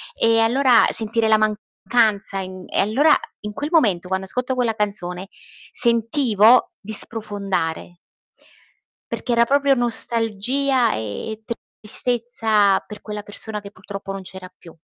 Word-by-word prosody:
E 225 0 +3
allora 245 +2 +4
sentire 225 0 -1
la 220 0 +5
mancanza 215 -1 0
in 185 -1 -7
e - - -2
allora 270 +10 +4 0.3
in 210 0 -5
quel 290 +6 -4
momento, 200 - +2
quando 190 +1 -2
ascolto 250 +5 -2
quella 240 -3 0
canzone 190 -3 -3 0.4
sentivo 235 -1 +3
di 215 +2 -9
sprofondare. 200 -6 -2 1.1
Perché 245 - -3
era 235 0 +4
proprio 280 +1 +3
nostalgia 235 +2 0
e 160 - -5 0.4
tristezza 220 -3 +1
per 210 -1 -10
quella 210 -1 -6
persona 210 +1 -4
che 200 0 -11
purtroppo 195 0 -8
non 195 0 -6
c'era 185 0 -11
più. 165 -2 -15
215 Hz, 130 wpm, -21 LUFS, 195-240 Hz, 1.1 s, la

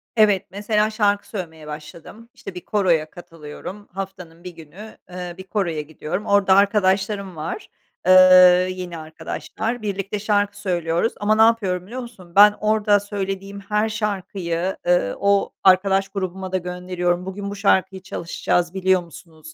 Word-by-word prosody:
Evet, 205 -4 +3
mesela 210 +2 0
şarkı 205 -2 0
söylemeye 160 -6 -7
başladım. 160 +9 -10
İşte, 195 - -10
bir 180 - -9
koroya 170 -7 +1
katılıyorum, 170 +4 -10
haftanın 185 -3 -8
1 180 - -7
günü, 170 +7 -12
ııı, 180 -1 -7
bir 190 - -8
koroya 185 -5 -2
gidiyorum. 160 +6 -5
Orada 200 -2 +4
arkadaşlarım 200 -1 +1
var, 160 - -6 0.4
eee, 185 - +6 0.6
yeni 180 -2 -6
arkadaşlar, 220 +8 -5
birlikte 200 0 -3
şarkı 205 -1 0
söylüyoruz 175 +2 -1
ama 210 +1 +2
ne 220 - +3
yapıyorum 200 -6 +2
biliyor 250 +5 -6
musun? 195 -8 -13
Ben 210 +1 +8
orada 210 -1 +3
söylediğim 195 -1 -5
her 210 +2 -1
şarkıyı, 190 -4 -3
ııı, 175 - +2
o 200 0 +1
arkadaş 195 +1 +4
grubuma 190 -1 -5
da 190 - +1
gönderiyorum, 180 0 -2
"Bugün 200 +1 -5
bu 200 - -6
şarkıyı 190 -1 +1
çalışacağız 175 -1 -2
biliyor 190 -1 +2
musunuz?" 160 -2 -14
190 Hz, 145 wpm, -21 LUFS, 175-205 Hz, 0.6 s, Ben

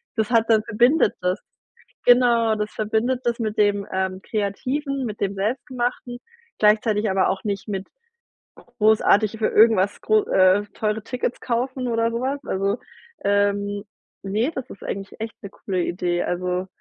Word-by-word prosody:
das 220 -2 0
hat 230 -1 +3
dann 220 -1 +5
verbindet 240 +5 +3
das“. 180 +2 0 0.7
Genau, 235 -3 +5
das 210 0 -3
verbindet 225 +4 0
das 235 0 0
mit 215 -2 -3
dem, 205 -1 +2
ähm, 190 0 -2
Kreativen, 260 +7 -2
mit 215 -2 -6
dem 200 0 -1
Selbstgemachten, 245 +3 -3 0.4
gleichzeitig 215 0 +3
aber 190 0 +2
auch 190 - -2
nicht 200 -1 -3
mit 195 -1 -4 0.9
großartig 215 0 +3
für 220 - +1
irgendwas 210 -3 +4
gro 215 -1 +2
äh, 185 +2 +4
teure 215 0 -1
Tickets 245 0 -3
kaufen 255 +2 -2
oder 230 0 +1
sowas. 260 +4 -2
Also, 195 +3 -1 0.5
ähm, 200 0 +1 0.4
ne, 210 +8 0
das 260 -1 -5
ist - - -11
eigentlich 200 +2 -6
echt 225 0 -6
'ne - - -5
coole 185 -3 -3
Idee. 175 0 -1
Also, 180 +1 -2
215 Hz, 150 wpm, -23 LUFS, 200-235 Hz, 0.9 s, dann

